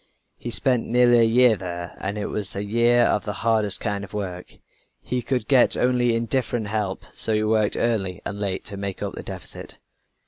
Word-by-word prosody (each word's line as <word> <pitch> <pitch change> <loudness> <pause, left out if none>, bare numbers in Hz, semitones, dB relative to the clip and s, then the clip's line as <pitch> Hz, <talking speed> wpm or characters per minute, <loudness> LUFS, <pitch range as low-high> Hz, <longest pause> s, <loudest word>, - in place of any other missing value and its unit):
He 120 - -7
spent 125 0 +1
nearly 120 0 +4
a - - +5
year 120 +1 +5
there 85 -2 -7
and 100 +2 -3
it 105 - -3
was 105 -2 -3
a 100 - -3
year 120 +3 +3
of 105 - +1
the 105 - -4
hardest 110 -4 +3
kind 100 -1 -3
of 100 +1 -10
work. 90 -3 -6 0.4
He 125 0 -3
could 125 -3 -2
get 130 -3 +4
only 125 -2 +2
indifferent 115 -2 -1
help, 105 -3 -3
so 110 - +6
he 105 - +1
worked 110 -1 +1
early 100 -6 -1
and 100 - -5
late 95 -2 -3
to 100 -2 -6
make 100 -1 -5
up - - -4
the - - -7
deficit. - - -8
110 Hz, 200 wpm, -23 LUFS, 100-120 Hz, 0.4 s, so